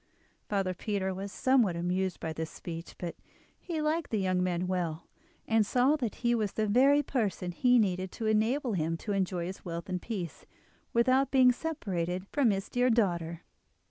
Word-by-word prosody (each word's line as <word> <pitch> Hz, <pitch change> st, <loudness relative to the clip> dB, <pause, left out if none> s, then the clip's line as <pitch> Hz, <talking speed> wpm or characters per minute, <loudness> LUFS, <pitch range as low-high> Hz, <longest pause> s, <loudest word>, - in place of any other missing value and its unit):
Father 195 Hz, -3 st, 0 dB
Peter 190 Hz, 0 st, -2 dB
was 195 Hz, +1 st, -5 dB
somewhat 245 Hz, -9 st, +3 dB
amused 180 Hz, +2 st, -1 dB
by 160 Hz, -1 st, -3 dB
this 160 Hz, 0 st, -4 dB
speech; 165 Hz, -1 st, -8 dB
but 175 Hz, -2 st, -5 dB, 0.4 s
he 325 Hz, -4 st, -3 dB
liked 315 Hz, +1 st, 0 dB
the 220 Hz, -, 0 dB
young 185 Hz, -2 st, +1 dB
man 180 Hz, -1 st, 0 dB
well, 175 Hz, -3 st, -2 dB, 0.4 s
and 225 Hz, -1 st, +4 dB
saw 250 Hz, +7 st, +3 dB
that 245 Hz, -8 st, -3 dB
he 240 Hz, -, +4 dB
was 215 Hz, -4 st, 0 dB
the 220 Hz, -, 0 dB
very 270 Hz, +7 st, +4 dB
person 210 Hz, -9 st, -1 dB
he 245 Hz, +8 st, +4 dB
needed 185 Hz, -4 st, +1 dB
to 225 Hz, -, -5 dB
enable 225 Hz, +4 st, +1 dB
him 165 Hz, -2 st, -1 dB
to 210 Hz, -, -5 dB
enjoy 185 Hz, -3 st, 0 dB
his 185 Hz, +2 st, -7 dB
wealth 170 Hz, -2 st, -5 dB
in 180 Hz, -, -1 dB
peace, 185 Hz, -5 st, -6 dB, 0.4 s
without 255 Hz, +3 st, +3 dB
being 255 Hz, -2 st, +6 dB
separated 190 Hz, -, -3 dB
from 280 Hz, -5 st, +3 dB
his 195 Hz, -1 st, -1 dB
dear 250 Hz, +1 st, +2 dB
daughter. 170 Hz, -7 st, 0 dB
200 Hz, 175 wpm, -30 LUFS, 180-245 Hz, 0.4 s, being